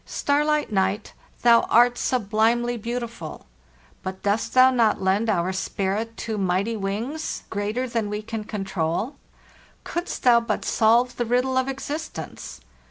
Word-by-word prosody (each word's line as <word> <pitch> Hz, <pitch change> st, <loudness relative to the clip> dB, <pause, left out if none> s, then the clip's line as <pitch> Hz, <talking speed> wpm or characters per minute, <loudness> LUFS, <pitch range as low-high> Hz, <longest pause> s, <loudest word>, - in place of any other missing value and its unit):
Starlit 300 Hz, -1 st, 0 dB
night, 195 Hz, +1 st, 0 dB, 0.3 s
thou 235 Hz, -1 st, +7 dB
art 240 Hz, +1 st, +5 dB
sublime 230 Hz, 0 st, +1 dB
ly 240 Hz, 0 st, -1 dB
beautiful! 235 Hz, -6 st, -5 dB, 0.6 s
But 190 Hz, 0 st, -6 dB
dost 210 Hz, +3 st, 0 dB
thou 255 Hz, 0 st, +7 dB
not 230 Hz, -4 st, +2 dB
lend 195 Hz, +4 st, +1 dB
our 185 Hz, -2 st, +1 dB
spirit 200 Hz, +4 st, -2 dB
too 220 Hz, -2 st, -3 dB
migh 185 Hz, 0 st, +1 dB
ty 230 Hz, 0 st, -2 dB
wings, 220 Hz, +10 st, -3 dB
greater 210 Hz, +6 st, -2 dB
than 230 Hz, -3 st, -2 dB
we 210 Hz, +1 st, -4 dB
can 220 Hz, -1 st, -5 dB
control? 195 Hz, -, -2 dB, 0.7 s
Couldst 345 Hz, +1 st, -4 dB
thou 240 Hz, -2 st, +6 dB
but 230 Hz, -, -3 dB
solve 235 Hz, +3 st, +3 dB
the 240 Hz, -, 0 dB
riddle 250 Hz, +3 st, +1 dB
of 260 Hz, 0 st, +2 dB
existence! 285 Hz, +4 st, -6 dB
225 Hz, 145 wpm, -24 LUFS, 205-245 Hz, 0.7 s, thou